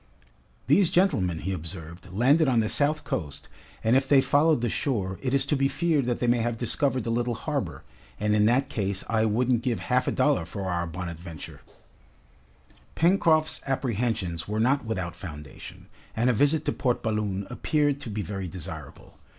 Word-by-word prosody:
"These 170 +6 +4
gentlemen," 95 - +1
he 95 - -2
observed, 85 +1 -8
"landed 135 - +3
on 125 -3 +3
the 110 -1 +1
south 150 +2 +3
coast, 75 -5 -5 0.4
and 115 +3 +3
if 135 0 +2
they 140 - +7
followed 145 0 +3
the 120 - +1
shore, 100 -8 -2
it 130 - -1
is 135 0 +2
to 145 - +1
be 135 0 +2
feared 155 -3 +1
that 120 -1 0
they - - -1
may 120 0 +3
have 115 0 -1
discovered 130 +2 0
the 115 - -2
little 120 0 0
harbor, 105 - -4 0.4
and 105 0 +1
in 105 0 +4
that 130 +5 +3
case, 100 -7 -2
I 110 0 +2
wouldn't 120 +2 +1
give 120 -2 -1
half 125 0 0
a - - +2
dollar 140 - +1
for 100 +3 -6
our 85 -2 -1
'Bonadventure.'" 85 -2 -8 1.3
Pencroft's 165 -3 +3
apprehensions 115 - -1
were 105 +1 -2
not 130 +3 +2
without 90 -6 -3
foundation, 75 -6 -10 0.3
and 120 +3 +3
a - - +1
visit 145 +6 +2
to - - +1
Port 125 -3 -1
Balloon 105 -3 -1
appeared 145 +2 0
to 135 - -7
be 105 0 -3
very 95 -2 -5
desirable. 90 -2 -9
115 Hz, 180 wpm, -26 LUFS, 95-140 Hz, 1.3 s, they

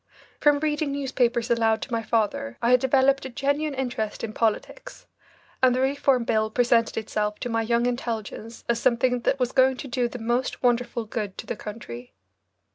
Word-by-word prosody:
From 295 -1 +4
reading 295 0 -1
newspapers 250 -4 0
aloud 225 -1 +3
to - - -9
my 230 -1 0
father 210 - -1
I 235 - +2
had 250 - +6
developed 270 +1 +3
a 265 - -5
genuine 285 +3 -1
interest 245 -5 -3
in 220 -2 -4
politics, - - -2 0.6
and 255 -1 +5
the - - 0
Reform 270 -1 +2
Bill 220 -1 +1
presented 235 -1 +2
itself 210 -1 -2
to 245 - -3
my 225 -1 0
young 235 +1 +1
intelligence 230 -2 -4
as 235 -1 +1
something 250 0 +2
that 270 +3 0
was 250 -1 0
going 260 0 +4
to 280 - -7
do 245 -1 0
the 245 - -7
most 240 +3 -2
wonderful 240 -1 +1
good 210 -3 -4
to - - -6
the - - -4
country. 125 - -9
240 Hz, 185 wpm, -25 LUFS, 225-265 Hz, 0.6 s, had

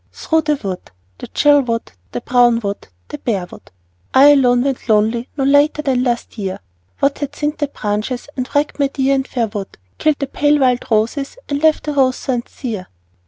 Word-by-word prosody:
Through 320 0 0
the 300 -1 +1
wood, 195 -9 -6 0.3
the - - -7
chill 290 -1 +4
wood, 230 -3 -3 0.2
the 125 - -4
brown 240 -1 +3
wood, 200 -1 -4 0.2
the 150 - -7
bare 200 -7 -1
wood, - - -15 0.5
I 275 +2 +8
alone 250 -4 +4
went 270 -3 -3
lonely 220 +3 +2
no 275 - 0
later 285 +2 +3
than 260 -4 +1
last 240 -2 -2
year, 190 -2 -3 0.4
What 280 0 +1
had 285 -1 -4
thinned 295 +1 -3
the 290 - 0
branches, 215 0 -3
and 255 -2 -3
wrecked 290 +1 0
my 280 - +3
dear 270 0 0
and 270 -1 0
fair 240 -3 -1
wood, 205 -2 -7 0.2
Killed 305 -2 +2
the 280 - -2
pale 290 +2 +2
wild 250 -2 +2
roses 235 - 0
and 285 0 -2
left 315 -1 +3
the 300 - -3
rose 260 -2 +2
thorns 245 -3 -3
sere? 215 -9 -6
260 Hz, 200 wpm, -18 LUFS, 230-285 Hz, 0.5 s, I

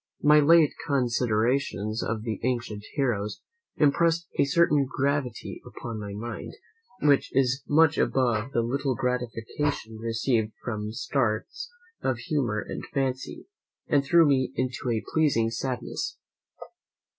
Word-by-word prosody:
My 150 +1 +7
late 155 0 +5
considerations 120 -3 0
of 110 -1 -2
the 110 -3 -3
ancient 120 -4 -2
heroes 105 -8 -1 0.4
impressed 165 +3 +3
a - - +5
certain 145 -1 +3
gravity 135 -3 -2
upon 115 -2 -7
my 105 -1 -6
mind, 115 +4 -6 0.5
which 145 -2 +4
is 135 0 +2
much 160 +1 +4
above 120 -2 +1
the 115 - +1
little 130 +2 -1
gratification 125 0 -2
received 115 -1 0
from 105 -3 -3
starts 115 - -2 0.3
of 130 -2 0
humour 120 -4 -1
and - - -5
fancy, 135 -2 -2 0.4
and 145 -1 +3
threw 165 +4 +5
me 130 -3 +2
into 130 -1 -2
a 115 -2 0
pleasing 130 -8 +2
sadness. 125 0 -3
125 Hz, 120 wpm, -27 LUFS, 115-140 Hz, 0.5 s, My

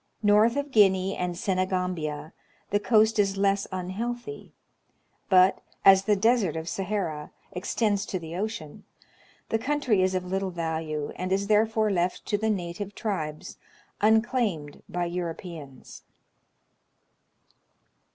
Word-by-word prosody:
North 210 +3 +5
of 285 0 -2
Guinea 195 -4 +4
and 180 -1 -3
Senegambia 180 -5 -2 0.4
the 205 - +3
coast 220 +1 +3
is 195 -1 +2
less 200 0 +1
un 185 -1 -4
healthy; 240 - -5 0.8
but, 185 -1 +5 0.2
as 195 0 +7
the 210 - +3
Desert 215 -4 +2
of 160 0 -5
Sahara 180 -5 -3 0.2
extends 205 +2 0
to 185 - -2
the 165 -1 -7
ocean, 190 -6 -5 0.7
the 225 - +1
country 255 -5 +1
is 185 0 +1
of 185 0 -2
little 190 +1 -2
value, 160 -3 -3
and 185 +1 -3
is 195 +1 +1
therefore 215 +1 +2
left 180 -1 -1
to - - 0
the 220 +2 0
native 195 +1 -3
tribes, 155 -9 -4 0.4
unclaimed 220 - +1
by 175 0 -1
Europeans. 170 -5 -7
190 Hz, 125 wpm, -27 LUFS, 175-215 Hz, 0.8 s, as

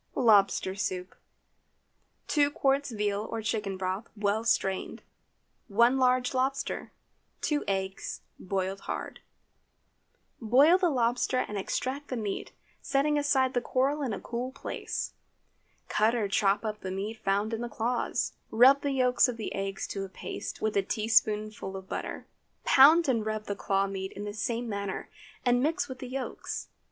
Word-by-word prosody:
LOBSTER 200 -5 +4
SOUP. 185 -2 -3 1.1
2 290 -2 +3
qts. 275 -4 0
veal 205 0 0
or 225 -1 -4
chicken 210 -3 -2
broth, 190 +4 -3
well 205 +2 +1
strained. 195 -5 0 0.6
1 235 +5 +4
large 255 0 +3
lobster. 265 +2 -1 0.5
2 295 -1 0
eggs—boiled 190 0 -3
hard. - - -4 1.2
Boil 275 - +6
the 360 -2 +3
lobster 245 -1 +1
and 210 - -6
extract 260 +8 -2
the 255 - -3
meat, 210 -3 -4 0.3
setting 280 +2 +1
aside 270 -3 +2
the 245 - +1
coral 275 +4 +1
in 265 -5 -1
a 200 - -3
cool 245 +2 -4
place. 275 - -4 0.7
Cut 220 +3 +2
or 220 -4 0
chop 200 +1 +2
up 210 -1 -3
the 190 - -5
meat 205 +4 -4
found 200 +3 +1
in 225 - -2
the 240 - -3
claws. 235 +2 -1 0.2
Rub 260 +5 +6
the 285 -1 -1
yolks 255 -1 +4
of 245 -2 -4
the 220 - -4
eggs 195 0 -3
to 195 - -3
a 195 - -7
paste - - -6
with 215 -1 0
a 200 - +4
teaspoonful 215 -2 +1
of 190 0 -10
butter. - - -5 0.4
Pound 310 +5 +7
and 235 -5 +2
rub 215 0 -2
the 200 - -3
claw 195 0 +1
meat 195 -1 -5
in 205 - -6
the 205 0 -5
same 235 +3 -2
manner, 200 -3 -4 0.3
and 245 0 +4
mix 305 +1 0
with 260 -2 -8
the 255 - -6
yolks. 265 0 -5
225 Hz, 155 wpm, -29 LUFS, 200-260 Hz, 1.2 s, Pound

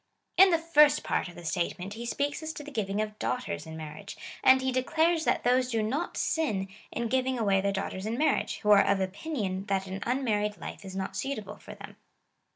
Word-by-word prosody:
In 385 +2 +8
ihefirst 300 -3 +4
part - - 0
of 175 - -13
the 175 - -10
statement 180 +3 -2
he 235 +2 -6
speaks 285 +5 -1
as 315 0 -4
to 295 - -8
the 295 - -9
giving 210 -4 -1
of 215 0 -8
daughters 160 -12 -3
in 160 0 -7
marriage, 155 +5 -8 0.3
and 260 0 +7
he 260 0 0
declares 320 +6 +1
that - - +1
those 250 +1 +3
do 225 -3 0
not 280 +11 -2
sin 210 -12 0 0.2
in 235 0 -2
giving 260 +1 0
away 200 -4 +2
their 200 +1 +1
daughters 195 0 -3
in 230 +2 -2
marriage, 310 +3 +1
who 210 - +3
are 200 -1 +8
of 200 - +2
opinion 195 -1 -3
that 195 -1 0
an 190 +1 -5
unmarried 215 -5 0
life - - -8
is 190 -1 -8
not 190 0 -4
suitable 215 +1 -4
for - - -11
them. - - -11
215 Hz, 210 wpm, -29 LUFS, 195-270 Hz, 0.3 s, In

